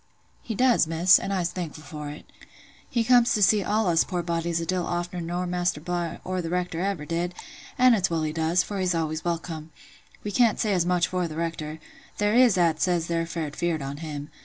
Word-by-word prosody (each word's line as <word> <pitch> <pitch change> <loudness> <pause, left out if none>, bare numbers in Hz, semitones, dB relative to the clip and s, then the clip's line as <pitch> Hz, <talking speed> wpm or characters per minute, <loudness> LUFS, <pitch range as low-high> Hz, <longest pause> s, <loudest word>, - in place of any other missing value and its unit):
"He 225 - -5
does, 250 -7 +4
Miss; 170 +3 +5
and 195 - -4
I'se 180 -3 0
thankful 160 -4 -6
for 150 0 -7
it. 150 - -10 0.6
He 235 -2 +1
comes 245 0 +4
to 210 - +2
see 200 +2 +4
all 215 +3 +1
us 170 -2 +3
poor 180 -3 -3
bodies 170 0 -1
a 165 - -3
deal 180 +1 -1
ofter 175 +1 -3
nor 175 +2 -2
Maister 175 -2 -1
Bligh, 175 +1 -3
or 185 0 -2
th' 165 - -5
Rector 180 -1 -2
ever 190 -6 -2
did; 170 +2 -2 0.4
an' 255 -1 +6
it's 195 -5 +2
well 165 -2 -1
he 155 -1 -2
does, 165 +3 +2
for 200 -2 -5
he's 180 -2 +1
always 155 -1 -2
welcome: 165 -2 -4 0.5
we 205 - -3
can't 230 0 +3
say 210 -2 +1
as 175 -2 +1
much 180 -1 +2
for 180 -1 -1
th' 155 - -8
Rector—there 165 +5 -4
is 245 -5 +5
"at 165 -3 +2
says 175 -3 +1
they're 165 0 -1
fair 160 -3 -4
feared 165 -1 -2
on 140 +1 -5
him. 150 -1 -6
175 Hz, 215 wpm, -26 LUFS, 165-185 Hz, 0.6 s, an